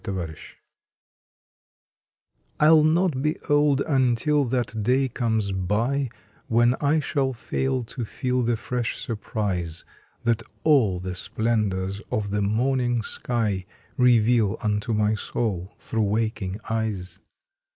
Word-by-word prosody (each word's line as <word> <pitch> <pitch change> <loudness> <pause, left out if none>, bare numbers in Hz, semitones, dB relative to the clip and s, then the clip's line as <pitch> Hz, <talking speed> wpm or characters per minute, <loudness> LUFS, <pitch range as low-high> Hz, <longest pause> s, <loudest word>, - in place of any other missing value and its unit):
EVER 95 -3 -2
YOUNG 80 - -10 2.2
I 150 - +6
LL 160 -1 +7
not 160 -3 +2
be 150 +2 0
old 145 -2 +3
until 140 +1 +2
that 120 -3 -1
day 130 +5 +2
comes 110 -4 -1
by 115 +9 0 0.4
When 120 +1 +4
I 150 +2 +3
shall 135 -2 0
fail 130 +2 -2
to 120 +1 -6
feel 125 +3 -1
the 120 -1 +1
fresh 120 0 -2
surprise 100 -8 -3 0.4
That 115 -1 +1 0.2
all 120 - +4
the 90 0 -4
splendors 100 -1 0
of 100 -2 -1
the 105 0 0
morning 120 +3 +1
sky 105 -6 -2 0.3
Reveal 120 -4 +4
unto 105 +2 0
my 105 0 +2
soul 100 -4 -3
through 115 - -2
waking 105 -2 -1
eyes. 105 -6 -3
115 Hz, 120 wpm, -25 LUFS, 105-130 Hz, 2.2 s, LL